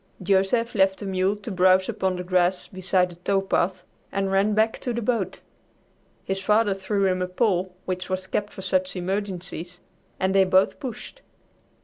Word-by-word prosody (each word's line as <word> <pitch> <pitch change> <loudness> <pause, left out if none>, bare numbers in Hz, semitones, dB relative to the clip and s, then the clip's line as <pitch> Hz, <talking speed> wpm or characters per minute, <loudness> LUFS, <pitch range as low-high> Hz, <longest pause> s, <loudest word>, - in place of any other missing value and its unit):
Joseph 200 +5 +2
left 190 -2 +3
the 205 - -7
mule 190 +1 +1
to 210 +2 -7
browse 185 0 +4
upon 190 -1 -1
the 180 - -4
grass 180 0 +1
beside 185 -1 0
the 175 - -13
tow 195 +2 +1
path 185 -1 0 0.3
and 195 -1 -1
ran 200 +2 +2
back 220 +1 +2
to 245 - -3
the 235 - -2
boat. 215 -5 -1 0.8
His 195 0 -2
father 210 0 +3
threw 195 +1 -1
him 185 -1 +1
a 180 - 0
pole 185 -2 0
which 185 0 -3
was 185 0 -2
kept 205 +2 -2
for 190 - -9
such 185 0 0
emergencies, 180 -2 -4 0.4
and 190 0 +1
they 195 0 +6
both 190 +1 +3
pushed. 270 - -7
190 Hz, 175 wpm, -24 LUFS, 185-205 Hz, 0.8 s, they